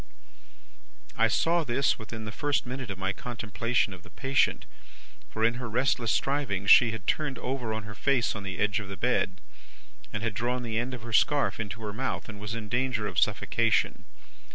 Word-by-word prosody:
"I 115 Hz, -, +4 dB
saw 165 Hz, +8 st, +2 dB
this, 130 Hz, 0 st, +1 dB
within 110 Hz, 0 st, -7 dB
the 105 Hz, -, -5 dB
first 145 Hz, +5 st, 0 dB
minute 125 Hz, -1 st, -5 dB
of 100 Hz, -, -4 dB
my 95 Hz, +1 st, -1 dB
contemplation 115 Hz, -1 st, -1 dB
of 95 Hz, -, -11 dB
the -, -, -15 dB
patient; 135 Hz, 0 st, +1 dB, 0.6 s
for, 110 Hz, -, -3 dB
in 120 Hz, +2 st, +1 dB
her 120 Hz, -, -4 dB
restless 120 Hz, -1 st, +1 dB
strivings 125 Hz, -9 st, +1 dB
she 120 Hz, -, +8 dB
had 110 Hz, -3 st, -5 dB
turned 150 Hz, -5 st, 0 dB
over 125 Hz, -4 st, -3 dB
on 110 Hz, 0 st, -3 dB
her 105 Hz, +1 st, -8 dB
face 125 Hz, +2 st, +1 dB
on 105 Hz, -, -4 dB
the 95 Hz, -3 st, -5 dB
edge 105 Hz, +1 st, +1 dB
of 105 Hz, -, -6 dB
the 100 Hz, 0 st, -7 dB
bed, -, -, 0 dB, 0.7 s
had 110 Hz, +1 st, -2 dB
drawn 120 Hz, +4 st, -1 dB
the 115 Hz, -1 st, -1 dB
end 125 Hz, +2 st, -2 dB
of 115 Hz, -, -10 dB
the 115 Hz, -1 st, -7 dB
scarf 145 Hz, +5 st, +3 dB
into 110 Hz, +1 st, -5 dB
her 105 Hz, -1 st, -4 dB
mouth, 130 Hz, +5 st, -3 dB
and 105 Hz, -3 st, -8 dB
was 105 Hz, +2 st, -4 dB
in 110 Hz, -2 st, -5 dB
danger 120 Hz, -1 st, 0 dB
of -, -, 0 dB
suffocation. -, -, +1 dB
115 Hz, 195 wpm, -28 LUFS, 105-125 Hz, 0.7 s, she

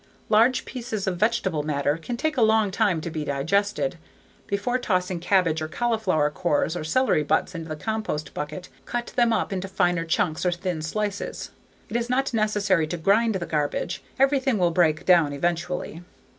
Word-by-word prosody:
Large 230 Hz, +4 st, +4 dB
pieces 230 Hz, -5 st, -4 dB
of 185 Hz, -2 st, -1 dB
vegetable 210 Hz, -7 st, +1 dB
matter 145 Hz, -1 st, 0 dB
can 200 Hz, +9 st, -5 dB
take 310 Hz, +4 st, -1 dB
a 250 Hz, -, +1 dB
long 220 Hz, -2 st, +4 dB
time 195 Hz, -5 st, +1 dB
to 165 Hz, -, -5 dB
be 155 Hz, -1 st, -3 dB
digested. 200 Hz, -, 0 dB, 0.5 s
Before 205 Hz, +6 st, -1 dB
tossing 185 Hz, -5 st, -1 dB
cabbage 175 Hz, -3 st, +2 dB
or 155 Hz, -, -2 dB
cauliflower 190 Hz, -7 st, 0 dB
cores 155 Hz, +1 st, 0 dB
or 175 Hz, -, -3 dB
celery 210 Hz, +2 st, +2 dB
butts 155 Hz, +5 st, 0 dB
into 165 Hz, -1 st, -6 dB
the 155 Hz, -, -3 dB
compost 215 Hz, -4 st, -3 dB
bucket, 175 Hz, +5 st, -5 dB, 0.2 s
cut 240 Hz, 0 st, -4 dB
them 240 Hz, -2 st, +3 dB
up 225 Hz, -, 0 dB
into 190 Hz, 0 st, -3 dB
finer 175 Hz, -3 st, +1 dB
chunks 165 Hz, -1 st, 0 dB
or 180 Hz, -, +2 dB
thin 175 Hz, -2 st, -3 dB
slices. 200 Hz, +5 st, -3 dB, 0.4 s
It 220 Hz, -, -7 dB
is 235 Hz, 0 st, -1 dB
not 265 Hz, +1 st, 0 dB
necessary 205 Hz, -6 st, +2 dB
to 175 Hz, -, -3 dB
grind 205 Hz, +6 st, +2 dB
the 180 Hz, -2 st, -2 dB
garbage. 150 Hz, -3 st, -2 dB, 0.2 s
Everything 270 Hz, -2 st, +2 dB
will 175 Hz, -2 st, +2 dB
break 160 Hz, -2 st, +2 dB
down 170 Hz, -6 st, +4 dB
eventually. 170 Hz, +2 st, -2 dB
185 Hz, 175 wpm, -25 LUFS, 160-220 Hz, 0.5 s, Large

